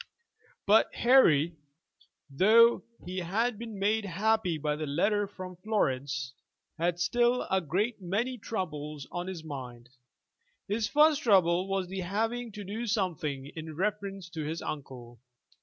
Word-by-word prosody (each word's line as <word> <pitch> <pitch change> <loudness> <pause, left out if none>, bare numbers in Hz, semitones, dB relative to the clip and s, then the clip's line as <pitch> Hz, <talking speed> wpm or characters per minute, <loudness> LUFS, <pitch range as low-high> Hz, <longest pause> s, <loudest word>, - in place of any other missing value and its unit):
But 210 +2 +4
Harry, 170 - +4 0.7
though 220 +11 +5 0.2
he 185 +1 -4
had 215 +6 -1
been 225 -3 -7
made 210 +3 +1
happy 200 -1 +1
by 150 0 -1
the 155 0 -4
letter 205 +8 +1
from 185 -2 -9
Florence, 135 -10 -1 0.5
had 175 +1 0
still 240 +8 +2
a 190 0 +3
great 200 - -1
many 225 +8 -2
troubles 150 -9 -5
on 175 +1 -4
his 180 -4 -6
mind. 125 -5 -8 0.8
His 215 +2 0
first 300 +2 +4
trouble 185 - +3
was 195 -1 -1
the 190 +1 -5
having 225 +6 -2
to 210 0 -7
do 220 +5 -4
something 165 - -2
in 160 -1 -7
reference 195 0 -3
to 165 -2 -5
his 160 +2 -4
uncle. 125 -5 -7
185 Hz, 140 wpm, -29 LUFS, 155-215 Hz, 0.8 s, though